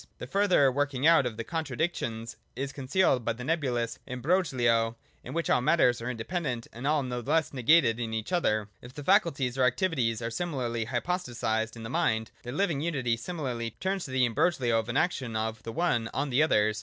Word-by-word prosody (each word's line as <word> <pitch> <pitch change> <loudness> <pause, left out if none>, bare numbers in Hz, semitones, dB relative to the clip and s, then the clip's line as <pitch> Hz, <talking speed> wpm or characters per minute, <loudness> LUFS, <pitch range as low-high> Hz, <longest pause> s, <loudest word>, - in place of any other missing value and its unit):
The - - -6
further 185 -9 +3
working 140 0 -1
out 165 -5 +6
of 110 -3 -6
the 115 - -3
contradictions 135 -6 -3 0.2
is 140 +1 -4
con 135 -2 -7
cealed 140 -5 +3
by 115 - 0
the 125 +2 -8
nebulous 125 -6 -1
imbrogho 125 -6 +1 0.3
in - - -7
which 170 - -1
all - - +3
matters 125 -4 +3
are 115 - -3
independent 125 0 -3
and 120 +4 -4
all 150 -1 +2
no 125 -1 -3
less 150 +6 0
negated 125 -3 +4
in 115 -2 -3
each 110 +5 -4
other. 110 - +1
— - - -39
If 120 +2 -12
the 145 - -7
faculties 140 -8 +2
or - - +4
activities 125 -3 +1
are 115 0 -4
similarly 120 -7 -2
hypostatised 120 -5 -2
in 115 - -9
the 115 - -6
mind, 110 -10 0
their 120 - -7
living 155 -1 0
unity 135 -8 0
similarly 120 -5 -4
turns 190 0 -1
to - - -8
the 130 -1 +2
imbroglio 120 -1 +1
of 110 +1 -5
an 120 - 0
action 130 -9 0
of 110 0 -2
the 115 - -6
one 120 -6 0
on 140 0 -1
the 125 +4 +3
others. 110 -8 +2
125 Hz, 205 wpm, -28 LUFS, 115-155 Hz, 0.3 s, out